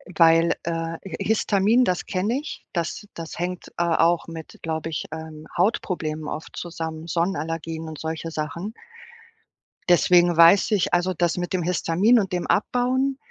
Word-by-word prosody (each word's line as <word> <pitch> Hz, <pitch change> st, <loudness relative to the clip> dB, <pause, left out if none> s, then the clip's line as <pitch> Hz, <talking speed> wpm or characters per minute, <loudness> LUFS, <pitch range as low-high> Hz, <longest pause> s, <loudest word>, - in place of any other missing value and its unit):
weil, 165 Hz, 0 st, +5 dB
äh 170 Hz, -, -2 dB, 0.3 s
Hi 180 Hz, -, -5 dB
Histamin, 220 Hz, +2 st, +3 dB
das 180 Hz, -6 st, 0 dB
kenne 210 Hz, +8 st, -1 dB
ich, 300 Hz, -, -8 dB
das 170 Hz, +4 st, -3 dB
das 165 Hz, -1 st, -8 dB
hängt, 180 Hz, +1 st, -4 dB
äh, 175 Hz, -, +2 dB
auch 170 Hz, 0 st, +2 dB
mit, 165 Hz, -1 st, -9 dB
glaube 160 Hz, 0 st, -3 dB
ich, 155 Hz, -, -3 dB
ähm, 160 Hz, -1 st, -8 dB
Hautproblemen 165 Hz, -5 st, -1 dB
oft 155 Hz, -, -6 dB
zusammen, 165 Hz, -1 st, -5 dB
Sonnenallergien 165 Hz, -2 st, -2 dB
und 155 Hz, -2 st, -8 dB
solche 160 Hz, +1 st, -4 dB
Sachen. 165 Hz, +7 st, -4 dB, 1.2 s
Deswegen 175 Hz, 0 st, +5 dB
weiß 170 Hz, +6 st, +6 dB
ich, 200 Hz, -2 st, +1 dB
also 175 Hz, +1 st, +2 dB
das 175 Hz, 0 st, 0 dB
mit 175 Hz, +1 st, -3 dB
dem 180 Hz, -, 0 dB
Histamin 180 Hz, +6 st, +3 dB
und 190 Hz, -3 st, -2 dB
dem 175 Hz, -, -1 dB
Abbauen, 255 Hz, +5 st, +1 dB
170 Hz, 155 wpm, -24 LUFS, 165-190 Hz, 1.2 s, weiß